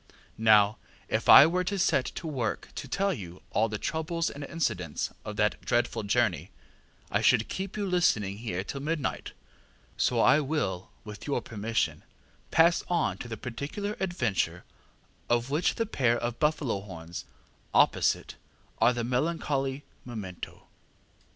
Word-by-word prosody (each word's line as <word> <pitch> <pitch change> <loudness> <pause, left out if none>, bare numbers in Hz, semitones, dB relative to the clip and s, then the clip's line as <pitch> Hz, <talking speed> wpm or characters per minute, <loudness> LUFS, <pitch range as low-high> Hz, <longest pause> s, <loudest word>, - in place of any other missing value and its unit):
Now 105 -2 +5 0.3
if - - -1
I - - +11
were 180 +3 +1
to 200 +2 -1
set 140 -8 +2
to - - -6
work 130 -9 -2
to - - -6
tell 195 +8 0
you 90 - -9
all 110 +1 +2
the 105 - -3
troubles 165 +5 -2
and 145 - -8
incidents 90 - -2
of 105 - -6
that 105 0 +1
dreadful 120 -1 0
journey 100 - +1 0.6
I - - +2
should 115 -3 +4
keep 195 +2 -5
you 205 - -1
listening 110 - +1
here 95 -6 -3
till 140 - -5
midnight; 155 -1 -2 0.6
so - - +2
I 150 - +6
will, 135 - -2
with 105 +3 -9
your 145 - +1
permission, 110 0 -2 0.5
pass 170 +1 +4
on 175 -1 0
to - - -6
the 115 -2 -5
particular 145 - -4
adventure 115 - -1 0.7
of 120 +2 +1
which 155 +5 +1
the 230 - 0
pair 125 - +1
of 120 0 -3
buffalo 150 -8 +1
horns 85 -4 -8 0.5
opposite - - +2 0.4
are 125 - +5
the 120 -1 -2
melancholy 135 +1 -1 0.2
memento. 105 -7 -8
125 Hz, 145 wpm, -28 LUFS, 105-160 Hz, 0.7 s, I